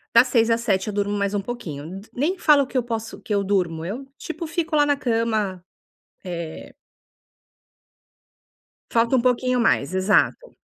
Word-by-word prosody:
das 235 +3 +7
06:00 230 -2 +3
às 230 0 +2
07:00 195 -4 0
eu 210 - -3
durmo 205 0 -1
mais 200 0 -1
um 200 - 0
pouquinho, 185 -6 -6
d 210 - -17
nem 315 +9 0
falo 290 -2 +5
que 260 - -4
eu 255 - +3
posso 225 -1 -5
que 210 - -2
eu 200 - +1
durmo, 175 -5 0
eu, 245 +9 -5
tipo, 330 0 -6
fico 330 +1 -3
lá 295 -1 +5
na 290 - +2
cama, 220 -7 -1 0.6
eh 170 -3 -6 2.2
Falta 235 +2 +2
uma 245 - +2
pouquinho 250 0 +2
mais, 180 -7 +2
exato. 205 - +1
225 Hz, 170 wpm, -23 LUFS, 190-255 Hz, 2.2 s, das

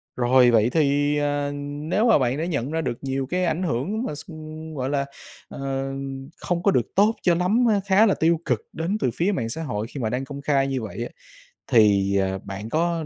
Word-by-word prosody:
Rồi 125 0 +5
vậy 115 0 +4
thì, 145 0 +2
à, 145 -1 0
nếu 150 +10 -1
mà - - +6
bạn 130 +2 0
đã 160 - -1
nhận 145 -5 -2
ra 165 0 0
được 120 -6 -3
nhiều 135 0 -2
cái 180 +4 0
ảnh 170 +2 0
hưởng 180 - -1
mà 150 - -3
x 145 +3 -10 0.5
gọi 130 0 -2
là, 140 -1 0 0.4
ờ, 135 0 -3 0.5
không 175 -1 -2
có 200 - +4
được 120 -7 -1
tốt 210 +3 +4
cho 175 -2 +3
lắm 205 +8 +2
á, 205 -2 +2
khá 200 +3 +5
là 200 - +3
tiêu 165 +1 +2
cực 120 -4 0
đến 175 +6 -1
từ 125 - +1
phía 185 +5 +1
mạng 115 - -2
xã 160 +8 -4
hội 110 -6 -3
khi 140 - -7
mà 110 - 0
đăng 125 +3 -2
công 140 +1 -7
khai 140 -2 +2
như 135 -2 -2
vậy 110 +2 -5
á, - - -5 0.6
thì, 100 -3 +4
à, 95 0 0
bạn 100 +3 -6
có 165 +1 0
145 Hz, 225 wpm, -24 LUFS, 125-170 Hz, 0.6 s, mà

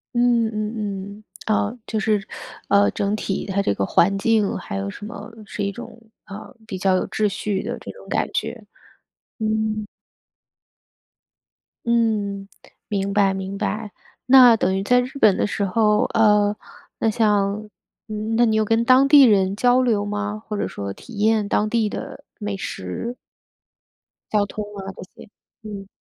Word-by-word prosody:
嗯 240 -1 +3
嗯 215 +1 -3
嗯， 205 0 -5 0.2
啊， 215 +2 0
就 220 - -2
是， 210 -1 0 0.4
呃， 200 0 +5
整 200 +1 -1
体 195 -2 -3
它 200 0 0
这 100 - +1
个 100 - 0
环 195 - +3
境 215 -1 +1
还 95 - -6
有 100 0 -3
什 205 - -9
么 215 0 -9
是 205 - -5
一 200 - -1
种， 225 - -10 0.3
呃， 200 +6 -10
比 195 -4 -5
较 190 0 +2
有 - - -1
秩 215 - +1
序 200 0 -2
的 - - -4
这 - - -8
种 - - -15
感 - - 0
觉。 - - -3 0.8
嗯。 215 -1 -1 2.0
嗯， 210 -4 0 0.4
明 200 -1 -2
白 195 -1 +3
明 190 +1 -5
白。 215 +1 -3 0.3
那 250 -3 +8
等 190 -2 +1
于 195 - -1
在 250 +4 +4
日 250 - -4
本 205 -7 +5
的 - - +1
时 205 - -2
候， 210 +2 +2
呃， 210 -2 +4 0.4
那 225 - +2
像， 210 -1 +1 0.7
那 240 +1 +4
你 220 - +1
有 220 0 +2
跟 225 +2 +2
当 255 +3 +5
地 285 -1 +8
人 195 -4 +4
交 245 +4 +3
流 225 -5 +1
吗？ 205 +1 -3
或 210 - -3
者 - - -1
说 100 -1 -5
体 240 - -14
验 215 -1 +2
当 210 +1 +1
地 225 -1 +1
的 - - -7 0.2
美 205 -1 -3
食 195 - -5 1.2
······交 205 - +2
通 210 +1 -5
啊 195 0 -6
这 - - -9 0.2
些， - - -13 0.3
嗯。 200 -2 -8
210 Hz, 175 characters per minute, -22 LUFS, 200-225 Hz, 2.0 s, 那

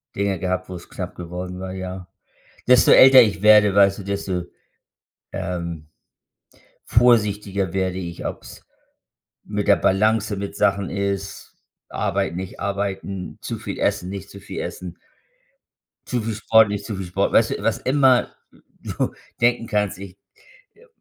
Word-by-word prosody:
Dinge 100 -1 -1
gehabt, 95 -1 -3
wo's 90 -2 -9
knapp - - -7
geworden 90 +1 -7
war, 95 0 -6
ja. 95 -1 -7 0.6
Desto 125 -1 +5
älter 130 -1 +9
ich 100 -6 -1
werde, 105 -1 +6
weißt 100 0 +4
du, - - -6
desto, 95 -2 -3 0.9
ähm, 85 -4 -5 1.0
vorsichtiger 105 -5 +2
werde 95 -1 -1
ich, 85 -2 -6
ob's - - -8 0.8
mit 105 0 -4
der 100 - +6
Balance 110 +2 +1
mit 100 +1 -6
Sachen 100 -2 +1
ist, 100 0 -4 0.4
arbeiten, 85 - -2
nicht 95 -1 -7
arbeiten, 100 -1 -4
zu - - -5
viel - - -6
essen, 90 - -1
nicht 100 0 -7
zu 100 - -11
viel - - -8
essen 90 -2 -7 1.1
zu 125 -3 -1
viel 110 +1 -3
Sport, 110 0 +4
nicht 100 0 -4
zu 105 - -4
viel 95 - -5
Sport. 90 - -1
Weißt - - +4
du, - - -4
was - - +1
immer 130 -2 +2 0.5
du - - -3 0.3
denken 120 -1 +2
kannst, 105 -3 -1
ich, 95 -2 -10 0.6
äh, 450 - -24
m 485 - -20
100 Hz, 150 wpm, -22 LUFS, 95-105 Hz, 1.1 s, älter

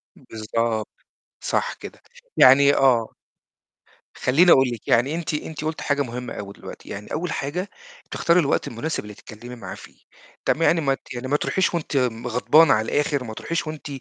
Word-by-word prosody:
بالضبط، 110 0 -3 0.6
صح - - 0
كده - - -11 0.4
يعني 140 +2 +7
آه. 120 -4 +2 1.0
خلّيني 165 +8 +4
أقول 130 -1 +5
لِك 120 -3 -7
يعني 130 +7 +2
أنتِ 165 -2 -4
أنتِ 150 0 -5
قُلتِ 155 0 -3
حاجة 145 0 0
مهمة 125 -1 -5
أوي 100 -1 -7
دلوقتي، - - -11
يعني 105 +1 -8
أول 175 +2 -2
حاجة 175 +8 -3 0.4
تختاري 170 +1 +2
الوقت 145 -5 0
المناسب 135 +6 -4
اللي 105 0 -10
تتكلمي 120 +5 -11
معاه 120 - -8
فيه، - - -14 0.5
تم 165 - +1
يعني 165 0 +3
ما 135 -2 +1
ت 135 - -9
يعني 125 +1 -5
ما 145 - +2
تروحيش 185 +4 0
وأنتِ 165 -4 -3 0.3
غضبانة 145 +6 +4
على 110 +1 +1
الآخر، 145 -2 0
وما 110 -3 -7
تروحيش 170 +7 -3
وأنتِ 155 -1 -7
135 Hz, 170 wpm, -23 LUFS, 115-155 Hz, 1.0 s, يعني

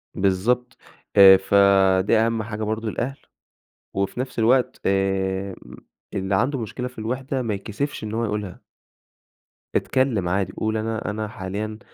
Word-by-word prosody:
بالضبط، 115 +7 0 0.4
آآ، 95 -1 +10
فدي 95 +1 +4
أهم 115 0 +1
حاجة 110 0 -5
برضو 110 +1 -2
الأهل، 125 +5 -3 0.8
وفي 100 +5 -2
نفس 130 -2 -4
الوقت 125 +2 +2
آآ، 95 0 0 0.6
اللي 95 0 -1
عنده 130 +5 +1
مشكلة 125 +3 -4
في 125 - -13
الوحدة 130 +4 -3
ما 115 -3 -2
يتكسفش 110 +7 -4
إن 110 0 -5
هو 115 +1 0
يقولها. 105 -3 -4 1.1
اتكلم 120 -9 +1
عادي، 95 0 -1
قُل 110 0 -1
أنا 110 0 -3
أنا 105 0 -3
حاليًا 105 +2 -5
110 Hz, 135 wpm, -23 LUFS, 95-115 Hz, 1.1 s, آآ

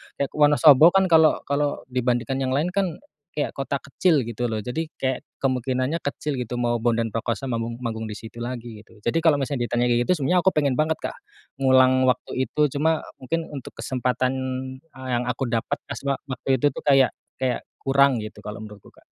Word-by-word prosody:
kayak 140 - -2
Wonosobo 150 +3 +6
kan 190 -2 +3
kalau 160 -1 +5
kalau 145 +1 -1
dibandingkan 125 +1 0
yang 130 0 0
lain 155 +6 0
kan 195 0 +1 0.4
kayak 150 -4 -3
kota 135 0 -2
kecil 140 0 +1
gitu 120 +1 -3
loh, 110 - -2
jadi 125 +9 -3
kayak 130 -1 -1 0.2
kemungkinannya 130 +3 -1
kecil 145 +1 -3
gitu. 125 -1 -4
Mau 120 -1 0
Bondan 115 -2 0
Prakoso 115 +3 -2
manggung 115 -2 -3
manggung 110 -3 -4
di 105 - -6
situ 115 +1 -10
lagi 120 -3 -6
gitu. 110 - -21
Jadi 140 +8 +1
kalau 160 -3 +4
misalnya 135 -3 -2
ditanya 120 0 +1
kayak 120 0 +2
gitu, 180 - +4
sebenernya 175 +6 +2
aku 190 - +6
pengen 145 -3 +1
banget 155 +4 +1
Kak - - -5 0.5
ngulang 130 -1 +5
waktu 125 +1 -1
itu, 150 0 +2
cuma 160 +2 +1 0.2
mungkin 160 +6 -2
untuk 135 -3 -8
kesempatan, 130 0 -1 0.5
eee, 130 -5 -12
yang 120 0 +1
aku 130 +2 -1
dapet 120 +4 -1
kaswa 140 -1 -3
waktu 130 0 -6
itu 145 - -1
tuh - - -7
kayak 135 -4 +4 0.2
kayak 130 -1 -1 0.2
kurang 135 -1 +3
gitu, 110 0 -8
kalau 105 +2 -7
menurutku, 105 -2 -11
Kak. - - -24
130 Hz, 190 wpm, -24 LUFS, 120-145 Hz, 0.5 s, Wonosobo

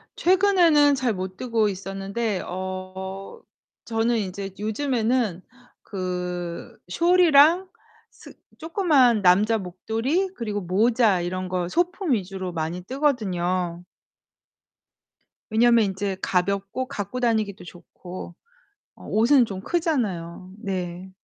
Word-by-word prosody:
최근에는 345 -6 +4
잘 255 -4 0
못 185 -1 -5
뜨고 230 -4 +1
있었는데 195 +2 -3
어 190 - -6 0.4
저는 230 +1 0
인제 195 -1 -4
요즘에는 225 -3 0 0.4
그 180 -3 -5
숄이랑 340 - +5 0.4
스 - - -15 0.3
쪼끄만 305 - +3
남자 205 +5 +4
목도리 225 - -2
그리고 210 -3 -3
모자 210 +2 +2
이런 185 +1 -3
거 180 -1 -1
소품 355 - -1
위주로 190 -3 -3
많이 165 +2 -3
뜨거든요. 185 - -1 1.7
왜냐면 230 0 +4
인제 195 0 -3
가볍고 200 +7 -1
갖고 205 +4 -5
다니기도 220 -6 0
좋고. 175 0 -10 0.6
어 - - -14
옷은 240 +4 +4
좀 195 -4 -6
크잖아요. 195 - -2
네. 185 -3 -5
205 Hz, 220 characters per minute, -24 LUFS, 185-255 Hz, 1.7 s, 숄이랑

